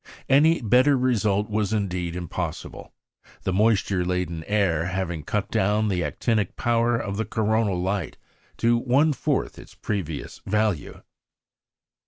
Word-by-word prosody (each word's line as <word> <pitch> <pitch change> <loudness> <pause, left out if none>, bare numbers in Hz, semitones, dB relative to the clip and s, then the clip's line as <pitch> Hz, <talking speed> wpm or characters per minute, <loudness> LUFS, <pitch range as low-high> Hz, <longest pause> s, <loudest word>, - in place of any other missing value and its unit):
Any 150 +2 +4
better 130 +6 +4
result 110 -5 +1
was 105 -1 -1
indeed 90 -5 -2
impossible, 90 -2 -5 0.5
the 95 - -1
moisture 100 -2 +2
laden 90 -2 -2
air 95 -6 +1
having 90 -3 -3
cut 100 +6 -3
down 105 +2 +1
the 90 -3 0
actinic 110 -3 -1
power 120 0 +1
of 100 -3 -4
the 110 - -1
coronal 110 -3 0
light 95 +2 -2 0.4
to 115 0 +3
one 140 +6 +3
fourth - - -2
its - - -14
previous 85 -8 -4
value. 105 -6 -1
105 Hz, 130 wpm, -24 LUFS, 90-115 Hz, 0.5 s, Any